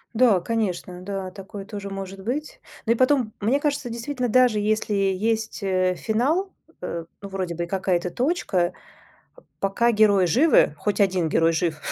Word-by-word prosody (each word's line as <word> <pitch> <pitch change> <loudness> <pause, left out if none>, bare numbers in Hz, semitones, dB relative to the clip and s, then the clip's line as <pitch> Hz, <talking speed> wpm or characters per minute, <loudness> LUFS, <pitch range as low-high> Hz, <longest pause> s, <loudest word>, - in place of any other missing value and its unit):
Да, 225 -5 +5
конечно, 185 -4 -2
да, 190 -1 -5
такое 195 +1 -9
тоже 200 -1 -7
может 195 0 -7
быть. 280 +8 -4 0.3
Ну 230 - +4
и - - -3
потом, 255 -3 +2
мне 235 +7 +1
кажется, 285 -4 -1
действительно, 245 +2 -3
даже 245 -2 +4
если 215 0 0
есть, 205 +3 0
э, 185 -1 +1
финал, 280 - 0 0.3
э, 170 -2 -4 0.2
ну 200 - -7
вроде 185 -3 -3
бы 170 - -2
и - - -5
какая-то 180 -1 -1
точка, 210 - 0 0.9
пока 215 +5 +2
герои 205 -3 +4
живы, 255 - +4
хоть 205 +6 -2
1 185 -4 +2
герой 165 +1 +3
жив, 165 -1 0
200 Hz, 160 wpm, -24 LUFS, 185-235 Hz, 0.9 s, Да